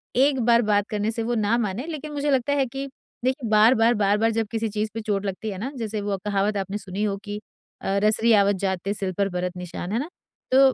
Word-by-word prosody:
एक 270 +1 +4
बार 235 0 +5
बात 205 -1 +2
करने 210 +1 -1
से 230 0 -2
वो 240 +1 -1
ना 220 +1 +2
माने 220 +2 -2
लेकिन 305 -2 -5
मुझे 290 0 0
लगता 265 +1 +2
है 280 -2 +2
कि 270 +2 -5 0.4
देखिए 260 -2 0
बार-बार, 225 +2 +5
बार-बार 210 +2 +2
जब 225 -1 -1
किसी 225 -1 -1
चीज 215 +1 -2
पे 225 - -2
चोट 205 -2 -1
लगती 195 +3 -3
है 190 - -6
ना 255 +7 -3
जैसे 220 -3 -3
वो 200 -1 -1
कहावत 205 0 +1
आपने 195 +1 -3
सुनी 195 0 -4
हो 200 -2 0
कि 205 0 -4 0.4
अ, 195 +1 0
"रसरी 220 +2 +4
आवत 200 -1 +4
जात 190 -1 0
ते 200 - 0
सिर 195 -2 -3
पर 200 -1 +1
बरत 180 0 -3
निशान" 180 0 -6
है 230 - +1
ना। 295 +6 -4 0.4
तो, 265 0 +6
215 Hz, 240 wpm, -24 LUFS, 200-240 Hz, 0.4 s, तो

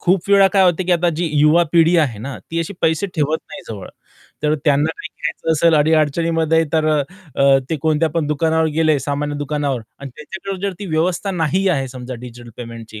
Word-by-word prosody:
खूप 185 +1 +1
वेळा 200 -1 +6
काय 195 -1 +3
होतं 180 +1 +2
की 180 - +2
आता 175 0 +2
जी 175 0 -1
युवा 155 +4 +5
पिढी 170 0 +4
आहे 130 -9 0
ना, 135 +5 -6
ती 165 - -2
अशी 165 - -4
पैसे 160 +4 +1
ठेवत 155 0 0
नाही 195 -2 -9
जवळ, 100 -4 -7 0.5
तर 150 0 +2
त्यांना 145 +1 +3
काही - - -7
घ्यायचं 155 +1 -3
असेल 160 +1 +3
अडी-अडचणीमध्ये 160 +1 +2
तर 160 -1 +2
अ, 150 -2 +2 0.4
अ, 135 -1 +6
ते 160 - 0
कोणत्या 160 0 +2
पण 160 -2 -1
दुकानावर 160 +2 +1
गेले 155 -2 +2
सामान्य 145 +2 -3
दुकानावर 145 -3 -2 0.2
आणि 140 -1 -8
त्याच्याकडे 190 +4 -7
जर 200 - -2
ती 205 - -6
व्यवस्था 170 +4 -1
नाही 180 +2 0
आहे 135 -7 0
समजा 125 0 -7
डिजिटल 120 0 -11
पेमेंटची 115 -2 -9
155 Hz, 200 wpm, -19 LUFS, 140-170 Hz, 0.5 s, वेळा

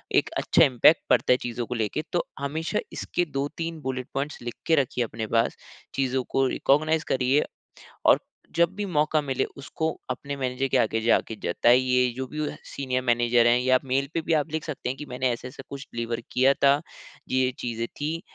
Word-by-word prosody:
एक - - +3
अच्छा - - +4
इम्पैक्ट 135 +4 +5
पड़ता - - +3
है - - +3
चीज़ों 120 0 -3
को 125 - -4
लेके, 110 +5 -1
तो 175 - +1
हमेशा 150 +4 -2
इसके 175 - -1
2-3 160 +3 -4
बुलेट 130 -2 -3
पॉइंट्स 140 +2 -3
लिख 120 -1 -5
के 165 - +5
रखिए 130 -4 +1
अपने 110 -1 -4
पास। 115 - +2 0.4
चीज़ों 130 -1 0
को 135 - +2
रिकॉग्नाइज 155 +5 +2
करिए, 130 +3 +3 0.6
और - - +6 0.4
जब 170 0 +5
भी 205 0 -3
मौका 155 -2 +2
मिले, 135 -2 -1
उसको 160 +3 -3 0.2
अपने 140 +3 -4
मैनेजर 130 0 -1
के - - +1
आगे 115 0 +1
जाके 115 0 +2
जताइए, 125 +6 +3
जो 130 0 -3
भी 150 - -8
वह 150 - -3
सीनियर 130 -2 -2
मैनेजर 120 -1 +3
हैं, 120 +1 +5
या 130 +1 +3
आप 130 - +2
मेल 135 +1 0
पे - - +1
भी 165 - -1
आप 150 0 0
लिख 160 -1 -2
सकते 150 -5 -4
है 125 - -1
कि 150 - -8
मैंने 125 0 -1
ऐसा-ऐसा 125 +2 -6
कुछ 140 0 -7
डिलीवर 115 0 -3
किया 130 +2 +4
था, 140 - +4 0.6
ये-ये 130 0 +2
चीज़े 115 -1 -3
थीं, 155 +3 -2
130 Hz, 195 wpm, -26 LUFS, 125-150 Hz, 0.6 s, और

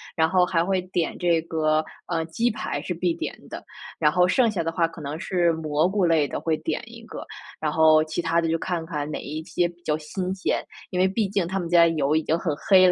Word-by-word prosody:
然 160 0 +3
后 185 +2 +3
还 170 -1 +1
会 190 0 +1
点 180 -2 -2
这 170 -2 +2
个 155 -1 +1 0.2
呃， 165 -2 -1
鸡 230 +9 0
排 215 -10 -3
是 175 - -6
必 175 0 0
点 - - -5
的， - - -7 0.4
然 150 - +4
后 180 +2 +4
剩 235 +5 +3
下 190 -6 -1
的 165 - -1
话， 165 0 +1
可 165 - -12
能 150 +2 -5
是 175 -2 +1
蘑 155 0 +1
菇 195 -1 +1
类 160 -4 +3
的， - - -4
会 160 -1 0
点 - - -3
一 - - -12
个。 - - -8 0.3
然 155 -1 -1
后， 155 0 +5
其 155 +2 -3
它 165 0 +1
的， 165 - -1
就 165 - +1
看 170 -1 -3
看 150 -3 -4
哪 155 - -4
一 155 +2 -5
些 175 +1 0
比 175 0 -15
较 150 -2 0
新 180 +4 -4
鲜， 190 - -1 0.3
因 180 - -1
为 185 - +5
毕 200 +2 0
竟 195 -3 0
他 190 +2 -2
们 175 - -3
家 170 -1 +6
油 155 -3 +1
已 160 - +2
经 160 - +1
很 165 -4 -2
黑 185 +4 +5
了， - - +5
165 Hz, 275 characters per minute, -24 LUFS, 155-180 Hz, 0.4 s, 家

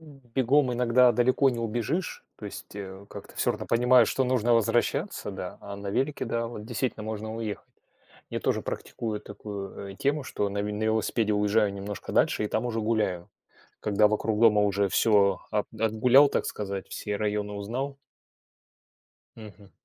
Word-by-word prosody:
М, 150 -4 -15 0.2
бегом 130 0 +3
иногда 125 +1 +4
далеко 130 +4 +3
не 120 - -4
убежишь, 120 - -2
то - - -11
есть, 100 0 -9
э, 95 0 -8
как-то - - -10
всё - - +1
равно - - -5
понимаешь, 125 +2 +5
что 135 - +1
нужно 120 -2 +2
возвращаться, 105 -2 0
да, 90 0 -7
а 100 - -7
на 100 0 -6
велике, 135 +6 -1
да, 115 -1 -1
вот 105 -3 -7
действительно 115 -1 -3
можно 110 0 -5
уехать. 110 -2 -5 0.6
Я - - -2
тоже - - 0
практикую 110 -2 -4
такую, 100 -1 -7
э, 95 - -14
тему, 145 +1 0
что 105 -5 -2
на 100 0 -2
ве 105 0 -3
на 105 +1 -2
велосипеде 110 0 +1
уезжаю 105 0 +2
немножко 100 0 -6
дальше 105 - +2
и - - -2
там 110 +4 -1
уже 115 -2 -2
гуляю. 105 -6 -1 0.5
Когда 105 0 +3
вокруг 105 0 0
дома 105 -3 +6
уже 100 -1 +1
всё 100 -2 +3
от 105 -1 0
отгулял, 120 +6 +5
так - - -1
сказать, 100 -2 -4
все 105 0 -4
районы 105 0 -2
узнал. 125 +8 -4 1.4
Мгм. 105 -2 -13
110 Hz, 170 wpm, -27 LUFS, 100-120 Hz, 1.4 s, дома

